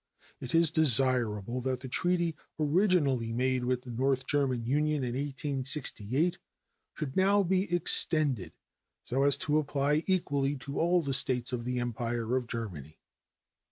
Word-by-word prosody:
It 130 - -4
is 165 -1 +5
desirable 125 -6 +1
that 130 0 -3
the 130 - -7
treaty 175 +4 0 0.2
originally 150 - +1
made 130 +2 -1
with 125 0 -1
the 125 - -9
North 130 +2 -1
German 130 -5 0
Union 150 +2 0
in 120 -1 -3
1868 135 - 0 0.6
should 140 -3 -6
now 200 +2 +3
be 185 +1 -1
extended 155 - +2 0.5
so 130 +3 -2
as 140 0 +4
to 150 0 0
apply 145 +1 0
equally 145 -7 0
to 140 +1 -6
all 175 +1 +2
the 140 -2 -2
States 125 -1 +4
of 120 -1 -4
the 125 0 -3
Empire 120 0 -3
of 125 -2 -2
Germany. 85 - -7
135 Hz, 145 wpm, -29 LUFS, 125-155 Hz, 0.6 s, is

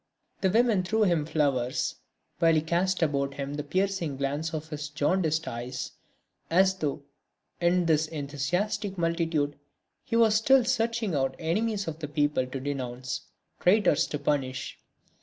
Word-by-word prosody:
The 190 - +3
women 225 -1 +3
threw 220 +4 +1
him 170 -6 +2
flowers, 135 -6 0 0.5
while 165 -1 +5
he 155 - +3
cast 175 +3 +1
about 140 -3 0
him 140 0 -4
the 145 0 -3
piercing 180 -2 -1
glance 145 +4 -2
of 155 -1 -5
his 150 -1 -5
jaundiced 160 +1 0
eyes, 125 +2 -5 0.6
as 190 +3 +4
though, 150 -4 -2 0.6
in 175 +1 +3
this 160 -1 +3
enthusiastic 165 +7 -2
multitude 165 -4 0 0.4
he - - -3
was 225 -2 +5
still 250 +4 +5
searching 230 -4 0
out 135 -2 0
enemies 200 +5 -1
of 160 -1 -4
the 155 - -4
people 145 -3 +1
to 130 +1 -5
denounce, 130 -2 -4 0.3
traitors 180 -4 +4
to 150 - -3
punish. 135 -3 -2
160 Hz, 145 wpm, -28 LUFS, 145-190 Hz, 0.6 s, while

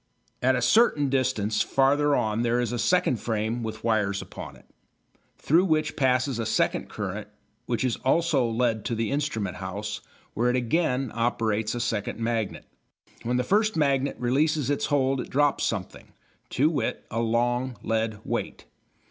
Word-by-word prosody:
At 130 +1 +3
a 125 - -1
certain 155 - +4
distance 110 -5 0
farther 145 +2 +3
on 110 +1 0
there 120 0 +1
is 120 -1 -1
a 120 - -2
second 155 -3 +2
frame 110 +1 -2
with 110 -1 -6
wires 105 -3 +1
upon - - -9
it, - - -19 0.7
through 170 +6 +3
which 155 -3 +1
passes 130 -1 +1
a 115 - -1
second - - 0
current, 105 0 -5 0.4
which 120 0 -1
is 125 -3 0
also 140 -3 +2
led 115 -2 0
to 120 - -1
the 115 +1 -1
instrument 110 -11 -2
house, 100 +3 -5 0.3
where 120 +3 +1
it 125 - +1
again 130 0 0
operates 115 -2 0
a - - -2
second 110 -4 -2
magnet. 115 -2 -2 0.6
When 125 +2 -1
the 125 - +1
first 215 - +2
magnet 140 -2 +1
releases 145 +3 +1
its 145 - 0
hold 135 -2 +1
it - - -8
drops 145 +1 +2
something, 100 -5 -5 0.4
to 150 +5 +2
wit, 135 -8 -2
a 115 - -1
long 120 +2 0
lead 110 -1 -1
weight. - - -3
120 Hz, 165 wpm, -26 LUFS, 110-140 Hz, 0.7 s, certain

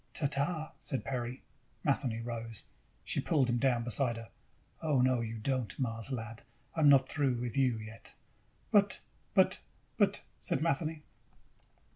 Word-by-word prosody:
"Ta 155 - +3
ta," 155 +3 +1
said 135 -4 -3
Peri. 125 -1 -3 0.4
Matheny 130 -5 +1
rose. 115 -2 -5 0.4
She - - 0
pulled 140 -5 +2
him 120 0 +1
down 125 -3 +2
beside 120 0 +1
her. 115 -1 -9 0.5
"Oh, 150 -5 +2
no, 125 -1 +3
you 115 0 -4
don't, 125 -2 -1
Mars 115 -1 -2
lad. 115 -2 -5 0.3
I'm 155 -3 +5
not 135 -2 +6
through 135 -5 +1
with 120 0 -3
you 130 -4 +3
yet!" 110 +1 -8 0.6
"But, - - +5 0.4
but, - - +4 0.4
but," - - +3 0.2
said - - 0
Matheny. 155 0 0
125 Hz, 145 wpm, -33 LUFS, 115-140 Hz, 0.6 s, not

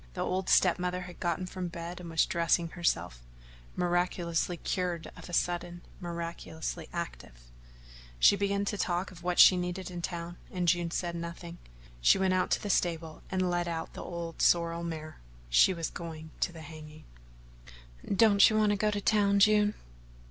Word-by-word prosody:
The - - -3
old 185 0 -2
step 180 -1 +4
mother 180 0 -2
had 180 -1 -10
gotten 175 +1 -1
from 185 0 -5
bed 170 +1 -7
and 175 -1 -8
was 165 -1 +3
dressing 170 0 +1
herself 90 - -1 0.5
miraculously 175 -1 0
cured 175 -2 -3
of - - -11
a - - -7
sudden, 175 0 -1 0.2
miraculously 170 -2 -5
active. 170 - -6 0.8
She - - +6
began 200 0 0
to 205 0 -3
talk 180 +1 -1
of 175 -2 -13
what 180 0 -1
she 185 - +9
needed 180 +1 -3
in 175 -1 -5
town, 170 0 -5
and 180 -2 -2
June 175 -1 +2
said 170 0 -3
nothing. 170 0 -7 0.4
She - - +6
went 190 -1 +2
out 185 0 +1
to - - 0
the 205 - 0
stable 165 -3 -1
and 185 -1 0
led 175 0 0
out 165 -1 -4
the - - -7
old 170 -2 -6
sorrel 170 0 +3
mare. 155 -2 -6 0.3
She - - +6
was 165 -3 -3
going 160 -2 -8
to - - 0
the 165 -2 -11
hanging. 155 0 -11 1.0
"Don't 200 0 +5
you 215 - +1
want 215 -1 +3
to 205 - +1
go 215 +2 +1
to 205 -1 -2
town, 200 -1 +3
June?" 210 +1 +4
175 Hz, 175 wpm, -30 LUFS, 170-185 Hz, 1.0 s, she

